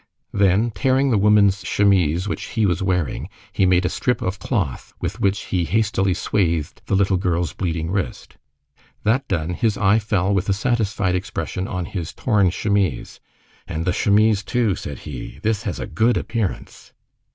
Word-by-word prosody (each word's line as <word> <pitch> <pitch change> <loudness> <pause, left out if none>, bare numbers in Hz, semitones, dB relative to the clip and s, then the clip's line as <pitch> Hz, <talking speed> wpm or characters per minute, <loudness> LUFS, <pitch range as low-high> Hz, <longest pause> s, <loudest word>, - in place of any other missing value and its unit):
Then 100 +4 +3
tearing 130 +4 +2
the 110 - +3
woman's 100 -1 +4
chemise 90 -3 +2
which - - -3
he 110 -3 0
was 90 -2 0
wearing, 90 -5 -1 0.2
he 95 -2 +3
made 90 0 +3
a - - +3
strip 125 - 0
of 90 +1 -2
cloth 90 - -2
with - - -4
which 100 0 +1
he 90 -2 +2
hastily 95 +1 +1
swathed 85 -7 -1
the - - +1
little 95 -1 +2
girl's 85 -3 -1
bleeding 85 -2 -2
wrist. 100 -1 -4 0.7
That 130 +6 +1
done, 85 -2 -1
his 110 +2 0
eye 105 0 +4
fell 100 -3 0
with 100 +1 0
a - - +4
satisfied 105 -4 0
expression 90 0 -3
on 90 -2 -3
his 90 -4 -5
torn 105 -6 +2
chemise. 100 +1 -1 0.5
"And 80 +1 -3
the 90 - +1
chemise 105 +1 +3
too," 115 0 0
said 70 -6 -6
he, 70 -1 -7
"this 110 -2 +1
has - - -5
a - - -3
good 120 +2 +1
appearance." 110 -5 -4
95 Hz, 170 wpm, -21 LUFS, 90-105 Hz, 0.7 s, woman's